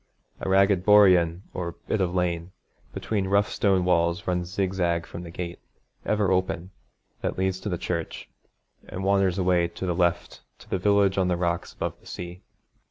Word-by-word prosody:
A - - -3
ragged 95 -1 +4
boreen, 95 -4 +5
or 85 -2 -4
bit 110 - 0
of 90 -1 0
lane, 85 -1 -1 0.4
between 100 -3 -2
rough 100 +1 +2
stone 95 -3 +2
walls 85 +1 +1
runs 90 -1 -1
zigzag 90 -3 0
from 85 - -8
the 85 - -8
gate, 85 +1 -6 0.5
ever 105 -3 +2
open, 95 -1 -1 0.5
that - - -2
leads 95 0 0
to 105 - -4
the 90 - -1
church, 85 -1 -4 0.6
and 95 - -6
wanders 100 -2 +2
away 90 -2 +2
to 85 - -7
the 90 - 0
left 85 0 0 0.2
to - - -17
the 95 - -1
village 100 0 +3
on 95 - +2
the 90 -1 +1
rocks 85 -1 -2
above - - -4
the - - -19
sea. 90 +1 -7
90 Hz, 175 wpm, -26 LUFS, 85-95 Hz, 0.6 s, boreen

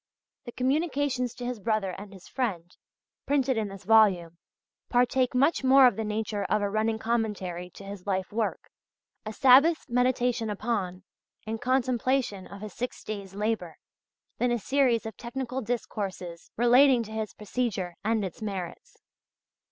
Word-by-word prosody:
The 240 - -7
communications 270 -2 0
to 245 - -6
his 245 -2 -3
brother 215 -2 0
and 200 +2 -9
his 190 -2 -13
friend, 185 -10 -3 0.5
printed 270 -2 +2
in 220 -2 -1
this 195 -1 -10
volume, 185 -7 +4 0.5
partake 250 +1 +2
much 275 +4 +3
more 265 0 +7
of 245 -5 +5
the 220 - -2
nature 210 -1 -2
of 210 +2 +1
a 200 - -1
running 220 +1 0
commentary 210 -6 -2
to - - -10
his 200 -1 -9
life 190 -1 -1
work, 225 0 -2 0.6
a - - -3
Sabbath's 270 +8 +5
meditation 245 -2 +1
upon 200 -4 -2 0.4
and 220 0 -4
contemplation 255 -4 0
of 200 0 -11
his 215 -3 -7
six 250 +1 -5
days' 200 -3 -6
labour, 210 -5 -2 0.6
than 245 - +2
a 240 - +2
series 250 0 +1
of 220 - -6
technical 255 +1 -4
discourses 195 -7 -4
relating 245 +1 +5
to 215 - -10
his 220 -1 -4
procedure 210 -4 -2
and 220 -1 +1
its 185 - -8
merits. 195 -4 -6
225 Hz, 150 wpm, -28 LUFS, 200-250 Hz, 0.6 s, more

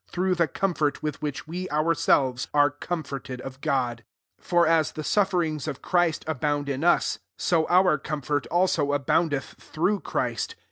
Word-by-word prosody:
I4t* 185 +1 +1
flba 170 -2 0
1» 150 -2 -4
which 150 0 -5
we 180 +3 -5
ourselves 145 -5 +2
arc 145 0 +3
com 175 -3 -2
forted 135 -2 -6
of 135 +1 -9
God 130 -6 0
I 110 - -35
5 - - -22
for 175 -1 +4
as 160 -1 +3
tlM 155 - -6
sufferings 175 -7 +1
of 135 - -5
Christ 175 -3 +1
abound 145 -1 -1
us, 175 - +2 0.2
so 165 -3 +1
our 180 -4 +4
comfort 145 -1 -2
also 170 -5 +1
abound 145 +3 +1
eth 140 -2 -4
through 195 +6 0
Christ. 455 - -2
155 Hz, 160 wpm, -26 LUFS, 145-175 Hz, 0.2 s, for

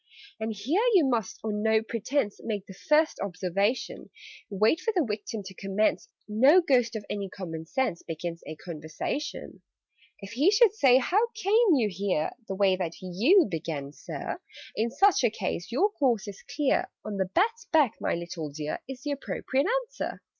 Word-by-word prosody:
"And 220 0 -2
here 245 - 0
you 340 -6 +6
must 235 -6 -1
on 210 -1 -2
no 220 0 +3
pretence 230 0 -2
Make 205 -4 -3
the 190 - -11
first 305 +10 +2
observation. 195 +4 -2 0.4
Wait 215 - +2
for 450 - 0
the 345 -5 +3
Victim 210 0 -4
to 190 - -9
commence: 195 +3 0 0.2
No 260 +11 +6
Ghost 250 -9 +2
of 210 -2 -5
any 200 -2 -4
common 165 -4 -7
sense 260 - -1
Begins 165 +1 -5
a 155 - -6
conversation. 160 - -5 0.6
"If 195 0 -9
he 280 +10 +3
should 425 0 +5
say 265 - +5
'How 390 - +2
came 430 -2 +4
you 235 -6 +2
here?' 185 -5 -1 0.2
(The 195 - -3
way 190 -1 +3
that 170 -3 -3
you 230 - +4
began, 155 -5 -4
Sir,) - - -6 0.3
In 225 +2 0
such 375 - +3
a 240 - +5
case 200 -2 -4
your 380 - +2
course 245 - +1
is 200 -1 -8
clear 290 -2 0 0.2
'On 210 -2 -4
the 190 -1 -1
bat's 455 +5 +1
back, 300 -8 +3
my - - 0
little 170 -2 -5
dear!' 150 +1 -5
Is 265 0 -8
the 295 - -2
appropriate 275 0 -1 0.2
answer. - - -5
220 Hz, 175 wpm, -28 LUFS, 190-285 Hz, 0.6 s, you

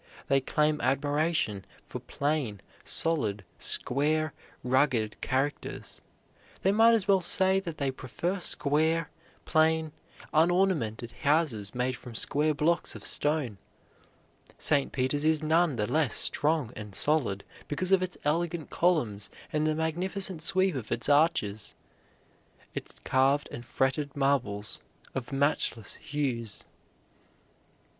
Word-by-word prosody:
They 135 0 +3
claim 150 +2 +1
admiration 145 - 0 0.2
for - - -7
plain, 140 -8 -2 0.2
solid, 110 -12 0
square, 155 +3 0 0.3
rugged 125 -4 +1
characters. 135 +3 -3 0.6
They 195 - +4
might 225 +3 +5
as 215 -4 0
well 195 -2 +4
say 190 +2 +4
that 170 -5 -7
they 140 -2 -1
prefer 170 +9 -3
square, 160 +1 +1 0.3
plain, 160 0 +2 0.4
unornamented 155 - +1
houses 140 -10 +1
made 125 +1 0
from 120 0 -11
square 150 +7 +2
blocks 165 +3 +1
of - - -9
stone. 145 -9 +2 1.0
St. 145 -3 +1
Peter's 135 +2 0
is 155 0 +2
none 160 -1 +2
the 105 -2 0
less 150 -2 0
strong 150 -5 +1
and 105 -2 -9
solid 135 -11 +1 0.2
because 180 +6 -2
of 190 -1 +5
its 185 -1 -4
elegant 165 +1 -1
columns 120 - 0 0.2
and 155 0 +1
the 155 - +1
magnificent 175 +3 0
sweep 185 +3 +2
of 125 -6 -6
its 120 - 0
arches, 145 - +2 1.0
its - - -7
carved 135 +2 +2
and 120 0 -8
fretted 135 +2 -1
marbles 120 -7 0 0.3
of 130 0 -5
matchless 135 -5 0
hues. 130 -8 -3
145 Hz, 120 wpm, -28 LUFS, 125-160 Hz, 1.0 s, might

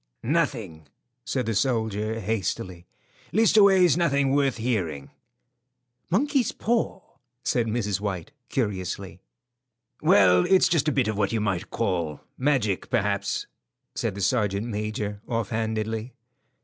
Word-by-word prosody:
"Nothing," 115 - -1 0.4
said 130 -1 -2
the 115 - -1
soldier, 110 -2 0
hastily. 95 -4 -3 0.4
"Leastways 200 -6 +5
nothing 140 -5 +2
worth 140 -2 +2
hearing." 95 - -2 1.0
"Monkey's 260 - +2
paw?" 225 -4 -1 0.4
said 120 -2 +1
Mrs. 105 -3 -1
White, 100 +2 -4 0.2
curiously. 100 - -3 0.8
"Well, 90 -3 +5
it's 190 -1 +5
just 160 -3 +1
a - - +3
bit 130 -5 +1
of 110 -1 -2
what 100 -1 +1
you 115 - 0
might 95 -4 -2
call 85 -9 -2
magic, 125 -8 0
perhaps," 100 -4 0 0.5
said - - -2
the 100 - -5
sergeant 100 -1 +1
major, 105 -2 -3
offhandedly. 110 +1 -2
110 Hz, 115 wpm, -25 LUFS, 100-135 Hz, 1.0 s, Leastways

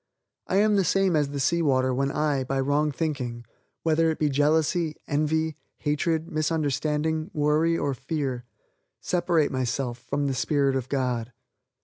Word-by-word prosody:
I - - -1
am 210 +1 +4
the 195 - +3
same 190 -1 +2
as 145 -2 +2
the 140 0 -4
sea 170 +6 +2
water 130 -4 +2
when 135 +2 0
I, 145 -2 0
by 135 +1 -2
wrong 145 +3 +1
thinking: 130 -6 -3 0.4
whether 165 0 +3
it 160 - -1
be 150 - +1
jealousy, 155 +3 +1
envy, 155 +1 0 0.2
hatred, 160 +2 0
misunderstanding, 155 0 -1
worry 155 +3 +2
or 140 -3 -1
fear 135 -2 -3 0.5
separate 175 -4 +1
myself 125 -1 -2
from 145 +3 -2
the 135 - 0
spirit 135 +2 +1
of 130 -1 -3
God. 125 -3 -1
150 Hz, 150 wpm, -26 LUFS, 135-160 Hz, 0.5 s, am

